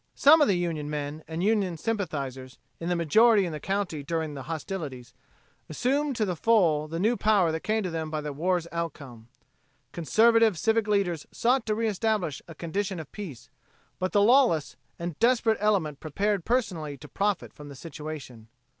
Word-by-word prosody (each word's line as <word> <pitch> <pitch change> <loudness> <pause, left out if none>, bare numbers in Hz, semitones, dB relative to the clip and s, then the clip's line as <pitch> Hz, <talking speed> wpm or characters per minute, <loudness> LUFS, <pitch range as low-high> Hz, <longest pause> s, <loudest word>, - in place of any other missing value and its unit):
Some 310 +3 +7
of 295 - +5
the 195 - +2
Union 165 -4 -2
men 150 +1 -4
and 165 +2 -3
Union 200 -5 +1
sympathizers, 140 - -4 0.2
in 170 - -4
the 175 - +1
majority 205 +6 +4
in 170 - -4
the 155 - -5
county 190 -4 -2
during 160 0 -3
hostilities, 150 -3 -6 0.6
assumed 270 - 0
to 220 - +1
the 180 -3 -2
full 170 -8 +3
the 165 +2 -4
new 220 +6 +2
power 205 -7 +3
that 160 - -2
came 215 +4 -1
to 180 - -3
them 160 -1 -3
by 155 0 -2
the 150 -1 -5
war's 175 +3 0
outcome. 140 -9 -6 0.6
Conservative 225 +4 +3
civic 225 +3 +1
leaders 195 -7 0
sought 245 0 +1
to 215 - +1
reestablish 215 - -1
a 165 - -10
condition 190 +3 -3
of 155 - -9
peace, 180 - -9 0.5
but 185 0 -1
the 205 -1 +4
lawless 235 - +4 0.2
and 170 -3 -5
desperate 230 -2 +3
element 185 -9 +1
prepared 195 +4 -1
personally 175 - -1
to 150 - -12
profit 200 +4 -1
from 145 -1 -11
the 140 - -10
situation. 150 -6 -8
175 Hz, 170 wpm, -27 LUFS, 155-215 Hz, 0.6 s, Some